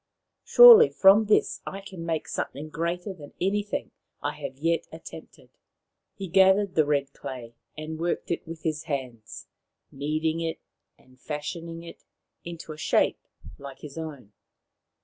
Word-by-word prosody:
Surely 470 -2 +9
from 200 +3 +5
this 210 - +1
I 195 - -6
can 190 -3 -9
make 165 -2 -3
something 150 +3 -5
greater 170 +4 -3
than 150 -6 -13
anything 205 +2 -2 0.3
I - - 0
have 135 - -6
yet 165 +3 0
attempted.' - - -12 0.4
' - - -57
He 195 -2 -5
gathered 190 +2 +4
the 155 -2 +2
red 140 -2 0
clay 120 -3 -8 0.2
and 155 +1 -6
worked 175 +1 -2
it 170 - -3
with 165 -1 -9
his 155 -1 -2
hands, 125 -8 -6 0.5
kneading 155 +3 -2
it 165 -1 -3 0.4
and 130 0 -24
fashioning 165 +3 -6
it 170 - -12 0.4
into 170 -2 -8
a - - -13
shape - - +1 0.3
like 140 -1 -10
his 145 -2 -10
own. 145 -10 -8
160 Hz, 150 wpm, -26 LUFS, 145-180 Hz, 0.5 s, Surely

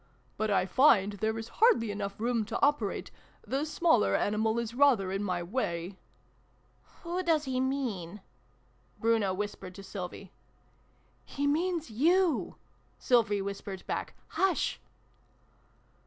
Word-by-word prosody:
But 215 +1 -1
I 195 -2 +2
find 205 -2 +4
there 220 +2 -1
is 225 0 -5
hardly 440 - +5
room - - -1
enough 200 -1 -4 0.3
to 220 - -3
operate 285 -9 -1 0.3
the 270 +6 -1
smaller 320 -7 +3
animal 220 +2 +1
is 235 -1 -3
rather 245 -8 +3
in 195 +1 -2
my 180 -3 -1
way 175 -3 -3 0.3
" - - -37
<( - - -37 0.2
Who 350 +1 -2
does 325 -4 +2
he 260 -1 -1
mean? 235 -9 -2 0.4
" 125 -1 -37
Bruno 225 -4 +2
whispered 190 -2 -5
to 195 - -10
Sylvie. 190 -1 -7 0.9
"He 285 - -4
means 325 -1 0
you! 335 - +2 0.2
" - - -37
Sylvie 210 -5 +2
whispered 195 -1 -6
back. - - -4
"Hush!" 385 -2 0
220 Hz, 140 wpm, -30 LUFS, 195-280 Hz, 0.9 s, hardly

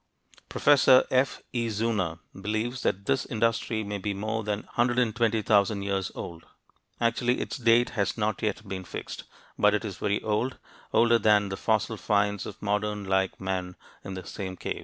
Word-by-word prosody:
Professor 135 -3 +6
F. 130 +1 +1
E. 120 -2 0
Zeuner 105 -6 -1 0.2
believes 110 +6 -3
that 100 +2 -1
this 135 +3 +1
industry 115 -1 0
may 100 0 -4
be 100 +1 -2
more 110 +2 -2
than 105 0 -2
120,000 115 -4 +2
years 95 -2 -1
old; 85 -1 -7 0.6
actually 120 +1 +1
its - - -4
date 120 -1 +4
has 100 -2 -1
not 110 -1 -1
yet 110 0 -2
been 95 -1 -5
fixed, - - -7 0.3
but 105 0 +5
it 105 - -2
is 100 -4 -5
very 100 0 0
old 110 +5 -1 0.3
older 115 0 +4
than 105 -1 +4
the 95 - -3
fossil - - 0
finds 100 -1 0
of - - -9
modern 105 0 -1
like 95 0 0
men 95 -1 -3 0.3
in 95 - -6
the 95 -1 -7
same 95 -2 -6
caves. - - -4
105 Hz, 165 wpm, -27 LUFS, 100-115 Hz, 0.6 s, Professor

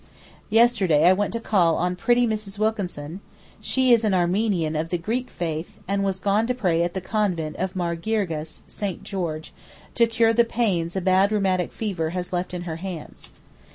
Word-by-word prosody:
Yesterday 210 -9 +4
I 185 - +7
went 205 +2 -1
to 230 - -1
call 180 -7 +2
on 180 +1 0
pretty 240 +6 +3
Mrs. 215 -3 -3
Wilkinson, 190 -7 -2 0.4
she 260 -2 +3
is 230 -1 +4
an 205 -3 +2
Armenian 180 -3 +1
of 160 +2 -2
the 175 - 0
Greek 235 +9 -2
faith, 165 -1 -4
and 200 +1 0
was 190 -1 -1
gone 205 +3 +1
to 250 - 0
pray 180 -8 +1
at 175 +1 -1
the 190 - -2
convent 180 -7 -1
of 190 0 -3
Mar 170 -2 -1
Girgis 165 -5 -3
(St. 200 -4 -5
George) 165 -5 -4 0.4
to 235 -1 +4
cure 225 0 +3
the 235 +1 +5
pains 195 -8 -1
a 190 - 0
bad 190 +2 +3
rheumatic 190 -4 +1
fever 185 -8 -2
has 180 0 -4
left 180 +1 -2
in 180 -1 -5
her 165 -2 -5
hands. 175 -3 -8
190 Hz, 190 wpm, -24 LUFS, 170-215 Hz, 0.4 s, I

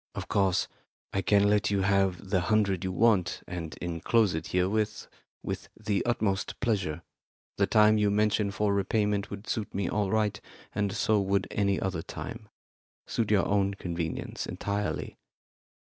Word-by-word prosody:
Of - - -5
course, 95 -3 +2 0.5
I 95 - +1
can 100 +2 +4
let 105 0 +3
you 100 -1 +1
have 95 -1 +1
the 95 - +3
hundred 100 -1 +1
you 95 - -1
want, 100 -2 +2
and 85 -3 -6
enclose 90 +5 +2
it 80 0 -3
herewith 105 +3 0 0.4
with - - -5
the 105 -2 0
utmost 105 -5 0
pleasure. 95 -9 -1 0.6
The 100 - +4
time 110 0 +5
you 105 -1 +3
mention 105 0 +2
for 100 0 0
repayment 105 0 0
would 100 +1 -7
suit 110 -2 -3
me 100 -1 0
all 105 -2 0
right, 105 0 0 0.3
and 100 -1 0
so 105 +1 +2
would 100 0 0
any 100 -2 +1
other 95 -4 -2
time. - - -8 0.6
Suit 115 -3 -1
your 105 -2 +3
own 100 -1 +1
convenience 85 -4 -4
entirely. 100 0 -3
100 Hz, 155 wpm, -29 LUFS, 95-105 Hz, 0.6 s, time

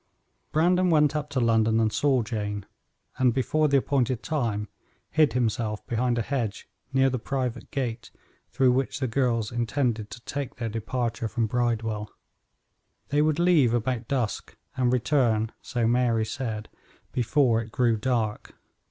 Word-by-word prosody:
Brandon 180 +3 +3
went 150 -2 +4
up 150 -1 -2
to 140 - -1
London 115 -1 +3
and 110 -2 +1
saw 135 -4 +2
Jane, 105 -3 -4 0.5
and 125 -2 +3
before 155 +4 +2
the 140 -1 +4
appointed 130 -3 0
time 115 -9 -1 0.4
hid 155 -6 +3
himself 110 -3 -1
behind 120 +1 0
a 115 - 0
hedge 115 -6 -3 0.2
near 135 0 +4
the 130 - -2
private 125 0 -3
gate 120 -4 -3 0.4
through 130 0 +3
which 130 +1 -1
the 130 - 0
girls 115 -3 0
intended 120 -2 -1
to 105 - -9
take 140 +1 -5
their 115 -2 -3
departure 115 +1 -2
from 115 +1 -1
Bridewell. 110 -2 -1 1.0
They 145 +1 +2
would 155 0 +2
leave 165 -9 +4
about 120 0 -1
dusk 125 -5 -2 0.2
and 125 -2 +2
return, 120 -4 +2
so 120 -3 -1
Mary 115 -1 +2
said, 110 -1 -4 0.4
before 125 -2 +2
it 110 -1 -9
grew 120 -2 +2
dark. 110 -2 -2
120 Hz, 150 wpm, -26 LUFS, 115-135 Hz, 1.0 s, went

